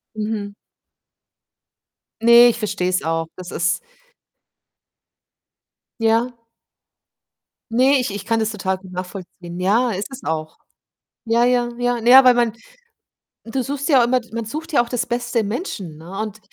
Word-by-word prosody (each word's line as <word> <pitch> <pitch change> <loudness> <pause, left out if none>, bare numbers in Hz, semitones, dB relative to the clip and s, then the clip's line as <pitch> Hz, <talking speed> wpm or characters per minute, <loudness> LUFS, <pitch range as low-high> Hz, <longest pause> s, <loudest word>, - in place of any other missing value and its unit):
Mhm. 210 -1 -4 1.7
Ne, 235 +1 +8
ich 235 - -2
verstehe 200 -4 -1
es 185 0 0
auch. 165 +1 -2
Das 185 -1 -8
ist 175 0 0 2.2
Ja. 225 +2 +2 1.4
Ne, 260 +3 +4
ich 250 - -1
ich 205 -1 -6
kann 225 -1 +1
das 220 -1 0
total 190 -3 -2
gut 185 -1 -14
nachvollziehen. 180 -1 -8
Ja, 225 +6 +2
ist 195 +1 -3
es 265 0 -9
auch. 155 -1 -4 0.7
Ja, 230 +1 +2
ja, 245 -1 +2
ja. 245 -1 0
Na 230 - -1
ja, 260 +1 +9
weil 250 - +7
man 235 -2 +2 0.9
du 260 +3 -3
suchst 280 +4 -4
ja 265 -5 +6
immer 250 +1 +2
d 235 - -20
man 230 -1 -3
sucht 310 +9 -6
ja 285 - +4
auch - - -11
das 245 -1 -1
Beste 240 0 -1
im 210 -2 -1
Menschen, 205 - -5
ne, 175 +5 -9
und 215 0 -6
225 Hz, 155 wpm, -20 LUFS, 190-245 Hz, 2.2 s, ja